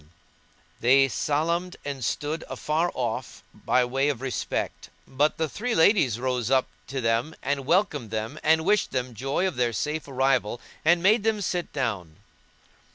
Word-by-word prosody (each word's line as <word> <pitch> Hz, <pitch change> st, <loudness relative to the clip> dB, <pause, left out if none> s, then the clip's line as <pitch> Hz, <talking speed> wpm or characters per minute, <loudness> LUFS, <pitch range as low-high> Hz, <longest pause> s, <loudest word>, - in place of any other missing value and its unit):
[FN#168] 75 Hz, -, -24 dB, 0.7 s
They 135 Hz, +3 st, +5 dB
salam'd 170 Hz, +7 st, -1 dB
and 140 Hz, -3 st, -4 dB
stood 150 Hz, +7 st, -2 dB
afar 160 Hz, +3 st, -1 dB
off 120 Hz, -3 st, -3 dB
by 125 Hz, -1 st, +1 dB
way 135 Hz, +3 st, +1 dB
of 140 Hz, -6 st, -2 dB
respect; 130 Hz, -1 st, -3 dB, 0.2 s
but 145 Hz, +3 st, +1 dB
the 160 Hz, -, 0 dB
three 230 Hz, -, -3 dB
ladies 160 Hz, -, +4 dB
rose 125 Hz, -2 st, -1 dB
up 130 Hz, -1 st, +3 dB, 0.2 s
to 135 Hz, 0 st, -3 dB
them 115 Hz, +7 st, 0 dB
and 140 Hz, -1 st, -2 dB
welcomed 165 Hz, -, +1 dB
them 110 Hz, +7 st, -4 dB
and 160 Hz, +1 st, +3 dB
wished 210 Hz, +2 st, +2 dB
them 125 Hz, -1 st, -3 dB
joy 135 Hz, -, -1 dB
of 185 Hz, -, -4 dB
their 120 Hz, -2 st, +1 dB
safe 150 Hz, +5 st, -2 dB
arrival 130 Hz, -4 st, +1 dB, 0.2 s
and 170 Hz, +2 st, +4 dB
made 215 Hz, +4 st, +5 dB
them 220 Hz, 0 st, +1 dB
sit 180 Hz, -3 st, -2 dB
down. 105 Hz, -, -3 dB
140 Hz, 160 wpm, -26 LUFS, 125-165 Hz, 0.7 s, They